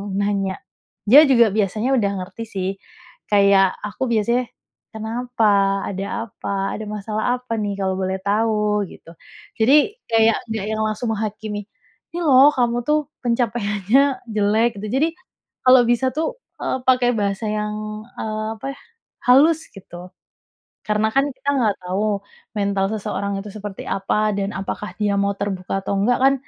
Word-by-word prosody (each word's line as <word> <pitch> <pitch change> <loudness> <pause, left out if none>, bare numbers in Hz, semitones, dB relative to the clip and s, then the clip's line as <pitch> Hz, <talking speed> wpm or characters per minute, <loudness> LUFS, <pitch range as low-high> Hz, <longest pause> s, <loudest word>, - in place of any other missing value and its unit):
nanya, 200 -1 0 0.5
dia 295 +6 +9
juga 235 -4 +5
biasanya 215 +3 0
udah 200 -4 +1
ngerti 230 +5 -8
sih, 190 -3 -3 0.6
kayak 200 -2 +5
aku 210 +5 -3
biasanya, 235 +3 +1 0.5
"Kenapa? 220 -3 +1
Ada 195 0 -4 0.2
apa? - - -8 0.3
Ada 215 - -6
masalah 210 +1 -3
apa 250 -2 -6
nih 205 -2 -2
kalau 190 -1 0
boleh 190 0 -1
tahu?" 210 0 +1
gitu. 165 - -14 0.5
Jadi, 290 - +4 0.2
kayak 225 0 +4
nggak 220 -2 -2
yang 220 0 -1
langsung 215 +2 -2
menghakimi, 210 0 -4 0.5
"Ini 345 - -3
loh 275 -3 +7
kamu 240 -1 +1
tuh 305 0 +3 0.3
pencapaiannya 235 +2 +1
jelek." 215 +3 +2
Jadi, 260 +10 0 0.6
kalau 255 -1 +8
bisa 250 +2 +2
tuh, 325 +11 -1 0.3
eee, 260 - -1
pakai 250 -1 +4
bahasa 200 0 -1
yang, 210 0 -2 0.5
eee, 215 0 -3
apa - - -9
ya, - - -18 0.5
halus 310 +6 +5
gitu. 180 -2 -11 0.8
Karena 215 +1 +1
kan 275 +1 +4
kita 280 - -1
nggak 220 -6 +1
tahu, 200 +3 -1 0.4
mental 200 -1 +1
seseorang 200 -1 -3
itu 210 - -8
seperti 205 -2 -7
apa, 210 +2 0
dan 195 0 -1
apakah 195 +2 -5
dia 205 -1 +1
mau 200 0 +1
terbuka 195 -1 -3
atau - - -1
nggak 240 +5 +3
kan, 270 +1 +5
215 Hz, 145 wpm, -21 LUFS, 200-240 Hz, 0.8 s, dia